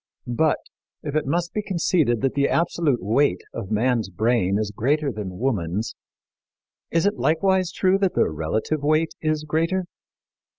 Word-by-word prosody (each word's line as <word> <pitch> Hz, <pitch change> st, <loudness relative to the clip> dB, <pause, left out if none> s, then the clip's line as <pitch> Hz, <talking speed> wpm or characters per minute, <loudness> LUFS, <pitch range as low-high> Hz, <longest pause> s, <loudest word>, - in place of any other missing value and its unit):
But, 145 Hz, +6 st, +1 dB, 0.5 s
if 145 Hz, -1 st, -4 dB
it 155 Hz, -, 0 dB
must 170 Hz, +4 st, -1 dB
be 210 Hz, -, -1 dB
conceded 170 Hz, -, +1 dB
that 135 Hz, -1 st, +1 dB
the 140 Hz, 0 st, +2 dB
absolute 160 Hz, -, +1 dB
weight 110 Hz, -1 st, +2 dB
of 100 Hz, -4 st, -5 dB
man's 110 Hz, 0 st, +1 dB
brain 100 Hz, -1 st, +1 dB
is 105 Hz, -1 st, -2 dB
greater 145 Hz, +5 st, +1 dB
than 100 Hz, -5 st, -6 dB
woman's, 105 Hz, -5 st, -1 dB, 1.0 s
is 165 Hz, +1 st, +1 dB
it 205 Hz, +1 st, +1 dB
likewise 185 Hz, +3 st, +2 dB
true 190 Hz, 0 st, +2 dB
that 195 Hz, -2 st, +1 dB
the -, -, +3 dB
relative 105 Hz, -, -2 dB
weight 155 Hz, +2 st, +2 dB
is 155 Hz, -1 st, 0 dB
greater? 165 Hz, +5 st, 0 dB
145 Hz, 155 wpm, -23 LUFS, 110-165 Hz, 1.0 s, the